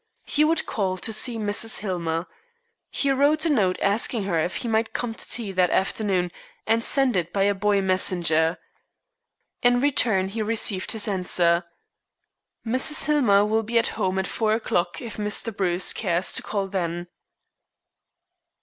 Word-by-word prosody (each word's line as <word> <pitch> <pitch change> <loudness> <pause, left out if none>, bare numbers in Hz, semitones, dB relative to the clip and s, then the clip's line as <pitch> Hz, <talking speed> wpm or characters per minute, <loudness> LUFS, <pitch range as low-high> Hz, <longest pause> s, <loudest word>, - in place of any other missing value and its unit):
He 300 - +1
would 320 +1 +1
call 190 -3 -2
to 220 +4 -4
see 230 +2 0
Mrs. 215 +1 +1
Hillmer. 170 -4 -3 0.6
He 280 - -1
wrote 290 +4 +2
a 325 - +1
note 195 -9 +1
asking 210 +2 +1
her 175 -4 -1
if 170 +4 -2
he - - -4
might 220 0 -1
come 240 -2 -3
to - - -5
tea 225 -4 -4
that 180 -1 +1
afternoon, 190 -2 -1 0.3
and 225 +1 +1
sent 270 -3 +2
it 175 -1 -2
by 195 0 0
a 200 +1 +2
boy 200 0 0
messenger. 170 -4 +2 1.0
In 245 0 +3
return 225 -8 +2
he 220 +3 -5
received 215 -3 0
this 220 -1 0
answer. 175 -3 +1 1.0
"Mrs. 260 +7 +4
Hillmer 240 -10 +3
will 220 +1 0
be 230 +2 -2
at 230 - +2
home 190 0 -2
at 190 - -1
four 215 0 -1
o'clock 175 -3 -2
if 230 - -8
Mr. 210 +1 -3
Bruce 180 -2 +2
cares 180 -3 0
to - - +3
call 200 -2 -3
then." 175 -3 -4
205 Hz, 160 wpm, -23 LUFS, 185-230 Hz, 1.0 s, Mrs